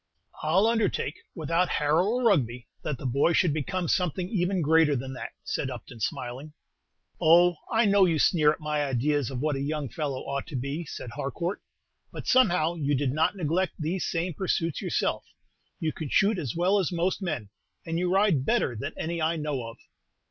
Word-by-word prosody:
"I 155 +2 0
'll 195 +3 +5
undertake, 225 -9 0 0.2
without 165 +3 0
Harrow 155 +5 +2
or 245 +4 0
Rugby, 125 - +2 0.2
that 150 - -3
the 135 - -9
boy 140 +7 +2
should 165 -2 +3
become 175 +4 -2
something 180 +1 0
even 185 -3 0
greater 155 -1 +4
than 130 +1 -4
that," 130 - -7
said 135 - -2
Upton, 125 -1 -9
smiling. 130 +4 -4 0.7
"Oh, 175 +2 +6
I 225 0 +3
know 200 -1 +5
you 165 -3 +2
sneer 155 -1 +4
at 155 - -5
my 150 -1 -1
ideas 140 +1 0
of 130 -2 -4
what 150 -1 0
a 135 - -3
young 145 -1 -2
fellow 140 -3 -3
ought 140 0 -4
to 160 - -7
be," 140 +6 -3
said 125 -4 -7
Harcourt; 170 - -3 0.5
"but, - - -8
somehow, 180 -10 +3
you 145 -4 0
did 135 -1 0
not 155 +7 +1
neglect 180 +1 0
these 170 +3 -2
same 170 +1 -1
pursuits 165 -3 -1
yourself. - - -1 0.6
You 155 -1 -1
can 155 -3 -6
shoot 200 +5 +3
as 140 -5 -4
well 185 +4 +3
as 190 - 0
most 175 +3 0
men, 155 - -3 0.4
and 165 0 -2
you 180 0 0
ride 190 -8 +3
better 125 -2 +1
than 140 +8 -5
any 170 +1 -3
I 160 +2 +1
know 150 -6 -3
of." 115 - -10
155 Hz, 190 wpm, -27 LUFS, 140-180 Hz, 0.7 s, Oh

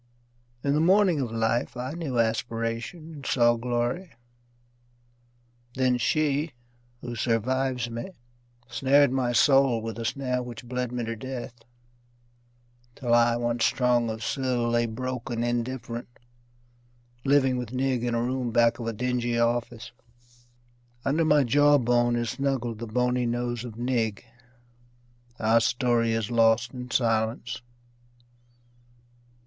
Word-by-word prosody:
In 140 - +1
the 150 - +2
morning 185 -1 +4
of 125 -4 -2
life 115 +2 -1
I 125 +2 -4
knew 155 -7 -3
aspiration 115 +7 -2
and 145 -3 -10
saw 120 -3 +3
glory. 120 +9 -2 1.7
Then 125 -1 +2
she, 150 +3 0 0.5
who 120 -1 -6
survives 125 +2 0
me, 115 +8 -6 0.6
snared 135 +2 +3
my 130 -2 0
soul 135 -1 +4
With 115 0 -6
a 115 - -4
snare 125 +1 -1
which 120 -1 -8
bled 125 0 -3
me 125 -1 -3
to 115 0 -3
death, 130 +1 -6 1.4
Till 120 -3 -1
I, 120 0 +4
once 120 0 -1
strong 120 -2 +2
of 110 0 -5
sill, 125 -2 -1
lay 120 0 +2
broken, 120 0 -4
indifferent, 120 0 -3 1.2
Living 135 -2 +3
with 125 -3 -5
Nig 130 -1 0
in 120 -1 0
a 115 - 0
room 125 0 -1
back 115 +1 +3
of 115 - -4
a 115 - -1
dingy 120 +1 -1
office. 115 0 -1 1.1
Under 155 +4 +2
my 150 -2 +4
jaw 145 +4 +5
bone 120 -1 +2
is 120 -1 -1
snuggled 130 -5 -2
the 115 - -5
bony 125 +2 0
nose 120 0 -2
of 115 -3 -8
Nig 120 -3 -1 1.1
Our 110 +1 +3
story 120 -1 +1
is 115 0 -2
lost 115 +1 +3
in 125 -1 -7
silence. 115 0 0
120 Hz, 130 wpm, -26 LUFS, 115-130 Hz, 1.7 s, jaw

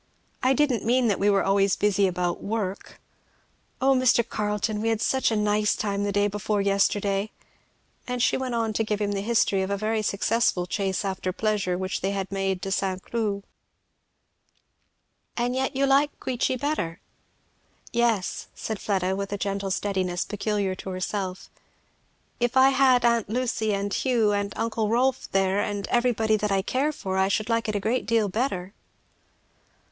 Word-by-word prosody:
I 260 +1 +3
didn't 270 -6 +1
mean 245 +1 +2
that 200 - 0
we 205 - +3
were 200 -1 +3
always 195 0 +3
busy 200 -1 +2
about 180 -1 -2
work. 200 -2 -4 0.8
O 270 -1 +4
Mr. 250 -2 +3
Carleton 210 0 -2
we 225 - 0
had 225 -1 0
such 265 +3 +1
a 225 - 0
nice 210 0 +2
time 200 -1 -2
the 205 - 0
day 205 +1 +2
before 210 +1 -1
yesterday!" 200 +1 +1 0.8
And 250 0 -2
she 245 - +3
went 260 -2 -2
on 225 -1 0
to 225 - +1
give 210 -1 -2
him 205 -1 0
the 200 -1 -2
history 210 -3 +2
of 190 - -2
a 200 - 0
very 215 +2 0
successful 205 -2 +1
chase 195 +1 -2
after 190 -1 -2
pleasure 200 -3 -1
which 185 0 -3
they 195 +1 -1
had 195 -1 -3
made 195 -1 -1
to 195 - -3
St. 190 -1 -1
Cloud. 210 -4 -2 1.9
"And 245 +1 0
yet 265 +1 -1
you 275 +1 +2
like 280 +2 +2
Queechy 255 0 -1
better?" 255 - -2 0.9
"Yes," 230 -5 0
said 220 -2 -4
Fleda, 190 -2 0
with 200 0 -4
a 205 - -2
gentle 200 -1 -2
steadiness 190 -2 -1
peculiar 205 -2 -1
to 185 - -7
herself, 185 0 -4 0.9
if 240 +1 +1
I 260 +1 +7
had 260 -2 +4
aunt 235 -3 +2
Lucy 230 -2 -1
and 200 0 -2
Hugh 235 -5 +2
and 200 0 -1
uncle 225 -1 -1
Rolf 255 +3 +1
there 195 0 +2
and 205 -1 -2
everybody 230 -3 +2
that 210 -1 -1
I 195 -1 +1
care 275 +8 0
for, 190 -10 -4
I 190 - +3
should 215 +3 -1
like 230 -1 0
it 215 - -2
a - - +1
great 225 +5 -1
deal 225 -3 +2
better." 195 -4 -2
210 Hz, 175 wpm, -25 LUFS, 195-235 Hz, 1.9 s, I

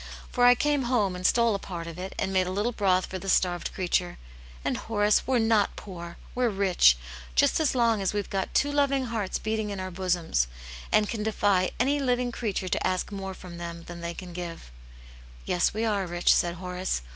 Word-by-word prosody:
For 245 -1 +3
I 245 - +8
came 290 0 +1
home 215 -7 +1
and 180 0 +1
stole 235 -2 +3
a 200 - -1
part 175 -3 -6
of 170 +1 -8
it, 190 +1 -6
and 195 - -1
made 185 -1 +2
a - - -2
little 205 +5 0
broth 190 -5 +2
for 185 - -6
the 195 - -5
starved 175 -2 +1
creature, 180 -1 -1 0.5
and - - +1
Horace, 210 -1 +1
we're 260 -1 +3
not 225 -3 +2
poor! 170 -3 -8 0.2
We're 250 -1 +1
rich, 190 - +4 0.4
just 60 - +4
as 305 -4 +1
long 230 -4 +3
as 190 - +1
we've 205 -1 -2
got 195 -1 -3
two 290 - +3
loving 280 -2 +2
hearts 205 -4 -1
beating 220 -1 -2
in 200 -1 -4
our 185 0 -4
bosoms, 175 - 0 0.4
and 215 0 +4
can 220 -1 -3
defy 205 -3 +2
any 280 +4 +2
living 250 -2 0
creature 210 -5 -3
to - - 0
ask 185 +2 -2
more 195 -1 -5
from 175 -2 -10
them 170 -1 -6
than 170 0 -9
they 170 0 -4
can 180 -2 -8
give," 170 - -7 0.4
' - - -19
"Yes, 180 -1 +2
we 220 +2 -2
are 200 -4 0
rich," 175 0 +3
said 175 0 +1
Horace. 180 - -3
195 Hz, 215 wpm, -27 LUFS, 180-225 Hz, 0.5 s, I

